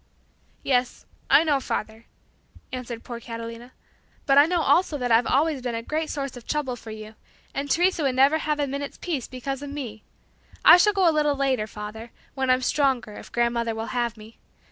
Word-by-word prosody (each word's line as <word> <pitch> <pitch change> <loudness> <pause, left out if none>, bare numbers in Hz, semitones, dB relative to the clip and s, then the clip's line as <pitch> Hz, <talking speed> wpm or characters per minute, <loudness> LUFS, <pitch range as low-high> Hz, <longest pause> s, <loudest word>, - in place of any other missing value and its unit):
"Yes, 250 -2 0 0.2
I - - +6
know, 295 -4 +2
father," 220 -3 -5 0.6
answered 245 -2 -6
poor 235 -1 -7
Catalina, 230 +1 -8 0.5
"but 275 - +4
I 285 +2 +7
know 350 -1 +1
also 335 -3 +3
that 250 -3 -2
I've 230 +1 +4
always 290 0 +1
been 245 -2 -3
a 230 0 -5 0.2
source 275 -3 -4
of 245 - -10
great - - -22
trouble 290 -5 -1
for 230 - -12
you, 215 0 -8 0.4
and 280 +1 -3
Teresa 350 +2 +2
would 270 -3 +1
never 275 +4 +4
have 300 -1 -1
a 290 - +2
minute's 280 +1 -5
peace 305 -9 -3
because 270 +2 -5
of 285 - -6
me. 250 -7 -6 0.6
I - - +10
shall 415 +3 +4
go 385 -3 +3
a 330 - +4
little 295 -1 +2
later, 265 -5 0
father, 215 +2 -8 0.2
when 265 -1 -2
I'm 255 0 +3
stronger, 260 -6 +1
if - - -11
grandmother 235 -1 0
will 225 +2 -5
have 240 -2 -1
me. 220 +1 -14
255 Hz, 195 wpm, -25 LUFS, 230-290 Hz, 0.6 s, I